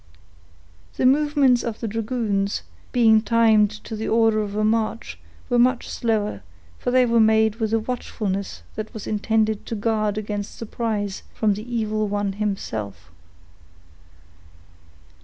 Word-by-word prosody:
The - - 0
movements 280 -2 +4
of 230 -2 -4
the 230 - -3
dragoons, 215 -2 -1 0.3
being 225 -3 +5
timed 220 -2 +4
to 225 - -6
the 220 +1 -4
order 225 -1 +3
of 205 -1 -3
a 215 - 0
march, 220 +1 -1 0.3
were 245 -1 +2
much 255 +1 +3
slower, 220 -3 -1 0.4
for - - -2
they 255 0 +4
were 235 -1 +3
made 220 0 +4
with 220 -2 -1
a 225 - +3
watchfulness 200 - -4
that 215 +2 -6
was 215 - -6
intended 215 0 0
to 230 - -3
guard 215 -1 0
against 205 -1 -4
surprise 215 -3 -3
from 215 -2 +2
the 215 +5 -7
evil 215 -1 0
one 205 -1 -1
himself. 110 - -4
220 Hz, 140 wpm, -23 LUFS, 205-230 Hz, 0.4 s, being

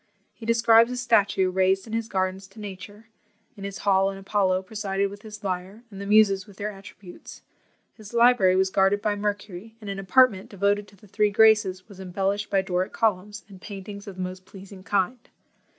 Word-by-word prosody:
He 225 - -11
describes 230 0 +5
a 250 - -4
statue 200 -6 +2
raised 190 +1 +1
in 220 - -9
his 225 0 -2
gardens 190 -1 -2
to 195 +3 -16
NATURE; 205 +2 -10 0.5
in 200 - -11
his 200 0 -5
hall 195 -1 +3
an 195 - -7
Apollo 195 -1 0
presided 200 -1 -2
with 200 0 -11
his 210 -1 -11
lyre, 190 +3 -4
and 195 0 -9
the 200 - -6
Muses 205 -2 +4
with 200 -2 -16
their 210 +1 -3
attributes; 195 -2 -13 0.5
his 215 -2 -13
library 235 -6 +4
was 190 0 +2
guarded 195 +1 +3
by 210 -1 +1
Mercury, 205 0 -5
and 205 -3 -6
an 195 - -5
apartment 195 0 +3
devoted 200 +1 0
to 205 - -19
the 200 - -20
three 210 +2 +1
Graces 210 -3 +3
was 200 -3 -14
embellished 195 +2 -2
by 195 -1 +1
Doric 185 -1 -2
columns, 210 -1 -1
and 190 -3 -14
paintings 200 0 -9
of 195 - -8
the 185 - -4
most 185 0 -7
pleasing 190 0 -13
kind. 200 +4 -1
200 Hz, 195 wpm, -25 LUFS, 190-210 Hz, 0.5 s, describes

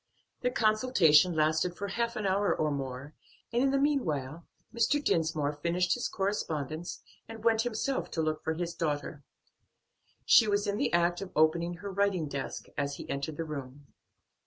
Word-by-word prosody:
Their 250 - +1
consultation 215 - +4
lasted 155 +3 +1
for 200 0 -4
half 235 +3 -1
an 215 - -3
hour 195 +1 +2
or 155 -1 0
more, 135 +1 -5 0.4
and 240 - +2
in 270 - +3
the 275 - +2
meanwhile 170 - -1 0.3
Mr. 235 +5 +2
Dinsmore 155 - 0
finished 170 +4 0
his 245 - -2
correspondence 165 -5 -3 0.2
and 225 -1 -9
went 225 -1 +3
himself 245 +3 -2
to 165 - 0
look 155 0 -2
for 160 - -1
his 170 0 -3
daughter. 150 -3 -3 1.0
She 225 - +7
was 205 0 +1
in 200 0 -1
the - - 0
act 175 +1 +2
of 195 -2 -6
opening 170 +3 +2
her 200 +3 -7
writing 195 -4 +1
desk 140 -1 -5
as 140 0 -1
he - - -9
entered 140 +2 -3
the 165 - -3
room. 140 -2 -8
170 Hz, 170 wpm, -30 LUFS, 150-210 Hz, 1.0 s, She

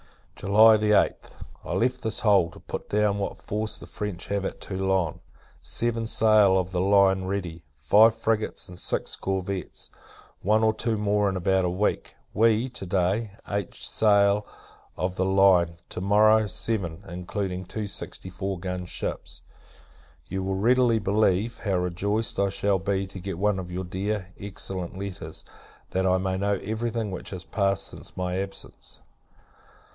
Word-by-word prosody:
[July 110 +3 +6
8th. 105 0 +2 0.3
I - - -4
left 125 +2 0
this 110 -2 -1
hole, 100 -6 +4
to 85 - -14
put - - -7
down 105 -1 +1
what 100 - -3
force 110 +1 -3
the - - -9
French 105 -4 -5
have 100 -1 -1
at - - -4
Toulon. 95 -4 -1 0.4
Seven 115 -1 -1
sail 110 -4 +4
of 95 0 -1
the 90 -2 0
line 95 -1 +4
ready, 90 -4 -4 0.2
five 105 - +5
frigates, 115 -1 -1
and 90 0 -10
six - - -1
corvettes. 95 -1 -4 0.5
One 110 +3 +2
or 110 0 +4
two 115 0 -1
more 105 -1 +1
in 95 - -2
about 95 +1 +2
a - - +1
week. 95 +4 -1 0.2
We, 115 +3 +3
to 120 -6 -7
day, 95 +4 0
eight 100 -3 -3
sail 100 -1 +3 0.5
of 90 0 -2
the 95 - +1
line 95 -3 +4
to - - -5
morrow, 105 +2 +4
seven; 95 -4 -3
including 90 +1 -4
two 105 +4 -4
sixty 95 -1 -3
four 95 +2 -3
gun 90 0 -4
ships. - - -5 0.8
You 95 +7 -4
will 95 0 -2
readily 120 +3 +3
believe, 105 +1 +1
how 100 -3 -1
rejoiced 95 +5 0
I 100 0 +2
shall 100 0 +1
be 95 0 -1
to 95 0 -9
get 95 -1 -5
one 100 0 +1
of 90 -1 -7
your 90 +1 -3
dear, 95 +1 -3
excellent 95 -2 -5
letters, 95 -5 -7 0.5
that 95 0 +1
I 95 0 +3
may 95 0 -1
know 100 +1 +1
every 110 +3 -2
thing 110 -3 -3
which 90 - -6
has 90 -2 -6
passed 100 -1 0
since - - -7
my 90 0 -1
absence. 95 0 -8
100 Hz, 160 wpm, -26 LUFS, 95-105 Hz, 0.8 s, July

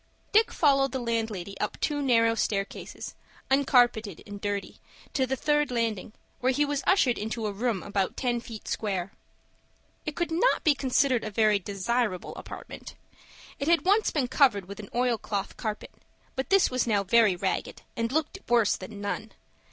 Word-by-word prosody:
Dick 440 +2 +4
followed 275 -3 +3
the 265 - -1
landlady 220 -5 -2
up 210 - -3
two 290 -1 0
narrow 230 -4 +4
stair 200 -3 0
cases, - - -9 0.4
uncarpeted 245 - +3
and 205 -1 -9
dirty, 205 -1 -3 0.3
to 265 -2 +1
the 265 - 0
third 295 +2 +1
landing, 225 -4 -2 0.3
where 255 +1 +2
he 290 +3 +2
was 285 -1 -1
ushered 285 -11 +3
into 220 +1 -3
a 210 - -1
room 215 -1 -1
about 200 -2 -1
ten 245 -2 0
feet 225 -2 -10
square. 195 -3 -2 1.0
It 300 - -3
could 345 -2 -2
not 355 +10 +2
be 305 - +5
considered 260 -2 +1
a 215 - -3
very 215 0 +3
desirable 200 +1 -2
apartment. - - -9 0.6
It 280 - -2
had 340 +1 +3
once 415 +3 +4
been 275 -5 0
covered 250 -7 +3
with 200 +2 -9
an 210 - -8
oilcloth 230 -5 -1
carpet, 215 -2 -5 0.4
but 265 - -3
this 390 -6 +4
was 255 -1 0
now 205 -3 +2
very 210 0 +4
ragged, 190 +1 -3
and 230 0 -1
looked 315 +6 -1
worse 235 -3 +4
than 200 +2 -9
none. 215 +2 -4
235 Hz, 170 wpm, -27 LUFS, 205-270 Hz, 1.0 s, be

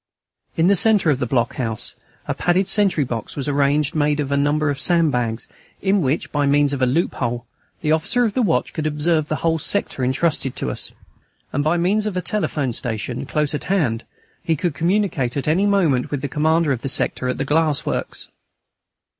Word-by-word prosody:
In 165 - +3
the 200 +2 +5
centre 200 -4 +4
of 135 - 0
the 125 - -1
block 120 -1 0
house 115 -4 -3 0.3
a - - 0
padded 180 +2 +1
sentry 195 -7 +2
box 115 -4 -5
was 140 -1 -4
arranged 145 +2 +1
made 150 -1 +1
of 140 -2 -2
a - - +2
number 145 +1 +1
of 140 - -4
sand 165 +3 +3
bags, 120 -2 -2 0.3
in 195 0 +2
which, 140 +1 -1
by 145 -1 +1
means 145 0 +3
of 135 - -3
a 130 - +4
loophole, 125 -4 -1 0.4
the 155 - 0
officer 160 +10 +2
of 215 - -1
the 255 - +1
watch 195 -8 +1
could 155 -1 -2
observe 155 +1 +1
the 155 - -1
whole 165 0 +2
sector 150 -5 -1
entrusted 130 0 0
to - - -2
us; - - -4 0.6
and 145 - 0
by 155 +3 +2
means 205 +5 +1
of 195 -3 -3
a - - 0
telephone 150 - -1
station, 115 +1 -3
close 150 -1 0
at 150 - -3
hand, 145 - 0 0.4
he 165 - 0
could 170 +1 -1
communicate 165 - 0
at 140 - -2
any 180 +7 +3
moment 170 -11 +2
with 145 -2 -3
the - - 0
commander 160 +2 +1
of 125 -3 -1
the 135 - -2
sector 130 - -1
at 125 - -2
the 135 - -2
glass 150 0 +1
works. - - -4
150 Hz, 205 wpm, -21 LUFS, 135-170 Hz, 0.6 s, the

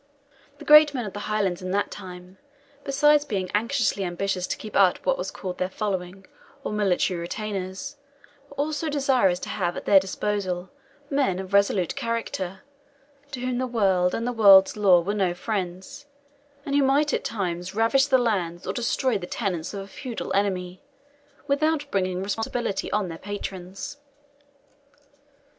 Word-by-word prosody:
The - - -12
great 300 -1 +8
men 245 -3 -2
of 205 - -6
the 205 - -5
Highlands 200 -4 0
in 185 - -5
that 205 +1 0
time, 180 -1 -10 0.4
besides 295 +2 +4
being 195 -9 -3
anxiously 225 -1 +1
ambitious 185 +1 -2
to - - -3
keep 215 - -9
up 190 -2 +5
what - - +3
was - - -4
called 180 -1 -6
their 185 - 0
Following, 190 -2 -4 0.4
or - - -3
military 190 -3 +1
retainers, 195 +8 -5 0.5
were 280 - -14
also 305 +2 -2
desirous 265 -10 +2
to - - -6
have 175 -4 -2
at - - -6
their 195 - +7
disposal 190 -1 -3 0.4
men 270 -10 +1
of 190 +1 -7
resolute 200 -1 +2
character, 230 -7 -3 0.7
to 260 -3 -6
whom 250 -1 -1
the 255 - -1
world 190 -6 +2
and 230 - -2
the 245 - 0
world's 195 -4 +7
law 190 -4 +5
were 195 +5 -2
no 190 -4 0
friends, 200 +8 -5 0.6
and 280 - -3
who 285 - +4
might 280 +2 +2
at - - 0
times 180 -3 -3
ravage 250 +5 +3
the 265 -2 +4
lands 185 -8 -1
or - - -2
destroy 240 -1 0
the 175 - -7
tenants 180 -8 -3
of 200 - -5
a 195 - -9
feudal 240 +3 -6
enemy, 185 -2 -1 0.6
without 295 +1 +1
bringing 185 -1 -1
responsibility 225 0 -2
on 210 -2 0
their 165 -1 -7
patrons. 195 +2 -6
200 Hz, 160 wpm, -25 LUFS, 185-250 Hz, 0.7 s, great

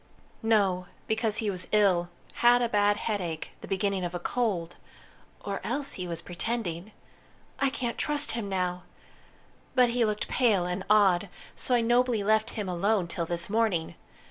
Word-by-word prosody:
"No, 195 -5 +2 0.2
because 220 -1 0
he 220 -3 0
was 185 -1 -4
ill 190 -5 +3 0.3
had 245 +1 +6
a - - +2
bad 205 -1 +3
headache 180 -9 -3
the - - -9
beginning 195 -1 -1
of 175 0 -3
a - - -2
cold. 180 -5 -1 0.7
Or 200 -1 -3
else 280 +4 -1
he 180 -1 -5
was 170 -1 -5
pretending. 185 -1 -4 0.7
I 275 - +3
can't 240 -3 -4
trust 295 -1 +2
him 225 -4 -3
now! 180 -1 -1 0.9
But 250 -2 +5
he 240 0 +1
looked 210 -1 -1
pale 210 -8 +2
and 180 +2 -3
odd, 200 -3 +4 0.3
so 250 - +1
I 240 - +3
nobly 240 -1 +2
left 215 +1 +2
him 210 -3 -2
alone 190 +2 +1
till 170 -1 -3
this 170 0 0
morning. 205 -7 0
205 Hz, 165 wpm, -28 LUFS, 180-230 Hz, 0.9 s, had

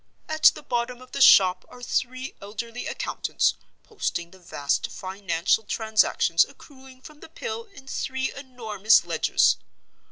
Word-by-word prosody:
At 315 0 -3
the - - -10
bottom 245 -2 -2
of 255 0 -15
the - - -4
shop 185 -7 +7
are 245 - -13
three 255 +1 -2
elderly 230 +4 -6
accountants, - - -1 0.3
posting 170 - -4
the 190 - -17
vast 145 -5 -2
financial 190 +1 -1
transactions 215 -7 +2
accruing 265 -2 -15
from 305 -1 -13
the - - -13
Pill 460 +6 -6
in 395 - -16
three 265 0 -3
enormous 225 -6 +1
ledgers. - - +2
245 Hz, 135 wpm, -25 LUFS, 200-265 Hz, 0.3 s, shop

